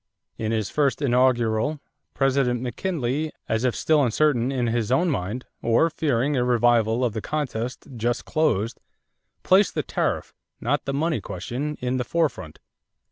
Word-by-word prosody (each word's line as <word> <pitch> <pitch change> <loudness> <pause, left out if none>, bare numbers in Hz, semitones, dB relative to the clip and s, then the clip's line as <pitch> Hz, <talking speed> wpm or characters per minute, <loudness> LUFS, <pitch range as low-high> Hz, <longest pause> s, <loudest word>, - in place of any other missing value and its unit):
In 110 0 -1
his 110 -3 -1
first 140 -5 +1
inaugural 125 +1 +2 0.4
President 135 -3 +2
McKinley, 140 - -2 0.2
as 110 +1 0
if 125 -2 +1
still 155 -2 +3
uncertain 125 0 +2
in 130 -3 0
his 115 -1 -1
own 170 +6 +3
mind 120 +1 -3 0.2
or 120 +8 +3
fearing 140 -2 0
a 125 - +2
revival 120 -1 +3
of 115 - -1
the 110 - -3
contest 125 -3 -3
just 120 +2 -1
closed, 115 - 0 0.6
placed 190 +2 +4
the - - 0
tariff, - - -2 0.3
not 140 +6 -1
the 135 - -2
money 155 -4 0
question, 130 +13 -4
in 125 +1 -1
the 125 - 0
forefront. 145 - -1
125 Hz, 150 wpm, -24 LUFS, 115-145 Hz, 0.6 s, placed